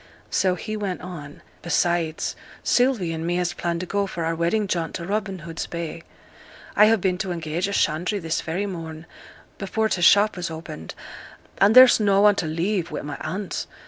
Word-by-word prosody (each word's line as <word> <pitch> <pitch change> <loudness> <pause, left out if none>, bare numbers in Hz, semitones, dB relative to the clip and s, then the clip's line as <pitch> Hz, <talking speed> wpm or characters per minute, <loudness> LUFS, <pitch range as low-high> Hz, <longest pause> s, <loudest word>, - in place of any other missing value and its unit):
So 185 -1 +2
he 215 +5 -5
went 200 -4 -3
on. 150 -6 -9 0.2
'Besides, 170 -1 0 0.3
Sylvie 245 -10 +2
and 160 0 -4
me 175 +1 -1
has 175 -1 0
planned 170 0 -2
to - - -3
go 200 +2 -1
for 170 -3 -4
our 165 - 0
wedding 170 +6 0
jaunt 170 -4 -2
to 170 - -5
Robin 200 0 -2
Hood's 165 -1 -5
Bay. 170 -1 -5 0.7
I 210 +1 +7
ha' 225 -1 +3
been 185 -1 0
to 190 -2 -2
engage 165 +1 -2
a - - -4
shandry 175 +2 0
this 165 -2 -2
very 175 +5 -2
morn, 160 -4 -7 0.5
before 220 +3 -1
t' 180 - -1
shop 205 +4 +5
was 175 -1 -3
opened; 160 - -8 0.6
and 205 +3 +5
there's 255 -2 +9
no 200 -2 +3
one 210 0 +6
to 160 - -1
leave 170 +3 -1
wi' - - -4
my 145 0 -5
aunt. 195 -1 -4
180 Hz, 190 wpm, -24 LUFS, 165-200 Hz, 0.7 s, there's